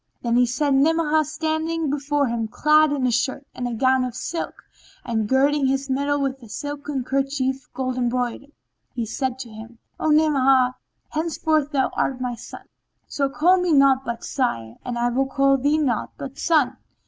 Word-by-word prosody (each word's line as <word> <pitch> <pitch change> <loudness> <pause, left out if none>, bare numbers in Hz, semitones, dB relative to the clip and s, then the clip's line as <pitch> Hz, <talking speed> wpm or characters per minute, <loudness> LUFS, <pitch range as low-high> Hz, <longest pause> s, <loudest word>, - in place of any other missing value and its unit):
Then 235 -1 +1
he 245 0 +4
set 275 +4 0
Ni'amah 310 +2 +3
standing 315 0 -2
before 290 0 0
him 230 -2 -2
clad 305 +5 +4
in 275 -3 0
a 250 - +2
shirt 260 +4 -1
and 245 -2 -4
gown 260 0 +3
of 250 -2 -4
silk 330 +6 -5 0.4
and, 220 -3 -1
girding 275 +1 +3
his 270 0 -1
middle 285 +2 0
with 270 -1 -2
a 230 - -13
silken 290 0 -4
kerchief 270 0 -2
gold 255 -1 -2
embroidered, 250 +3 -2 0.5
said 255 +3 -2
to 255 -2 -8
him, 225 +2 -11 0.2
"O 315 - 0
Ni'amah, 270 -4 +4 0.4
henceforth 310 -2 0
thou 275 -3 +1
art 260 -2 -1
my 250 -1 -2
son; 240 +1 -10 0.4
so 275 -1 -1
call 345 +7 +3
me 360 -1 +1
naught 275 -2 +5
but 235 -2 -5
sire, 115 - -2
and 245 -1 -4
I 240 0 +1
will 265 +3 0
call 275 0 +3
thee 290 +4 +2
naught 260 -8 -1
but 275 -1 -8
son." 310 -6 +2
270 Hz, 170 wpm, -23 LUFS, 250-290 Hz, 0.5 s, naught